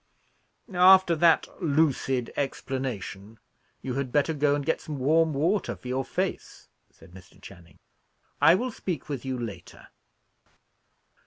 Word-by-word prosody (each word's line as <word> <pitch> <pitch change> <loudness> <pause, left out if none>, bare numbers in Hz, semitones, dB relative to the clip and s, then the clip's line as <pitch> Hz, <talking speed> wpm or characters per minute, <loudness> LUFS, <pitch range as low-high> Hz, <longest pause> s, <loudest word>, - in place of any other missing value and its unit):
"After 185 -1 +6
that 165 +1 +3
lucid 140 -5 0
explanation, 125 -7 -5 0.5
you 130 - -3
had 135 -1 -3
better 145 +3 +1
go 145 -1 +1
and 145 -1 -4
get 160 - -1
some 150 -2 -6
warm 160 +5 +2
water 165 +8 0
for - - -12
your 130 +1 -1
face," - - -5 0.2
said - - -19
Mr. 90 -1 -16
Channing. 85 -5 -15 0.6
"I 160 +4 +7
will 250 +5 -2
speak 175 - -5
with 135 -3 -5
you 130 -1 -3
later." 115 -4 -9
140 Hz, 135 wpm, -26 LUFS, 125-160 Hz, 0.6 s, I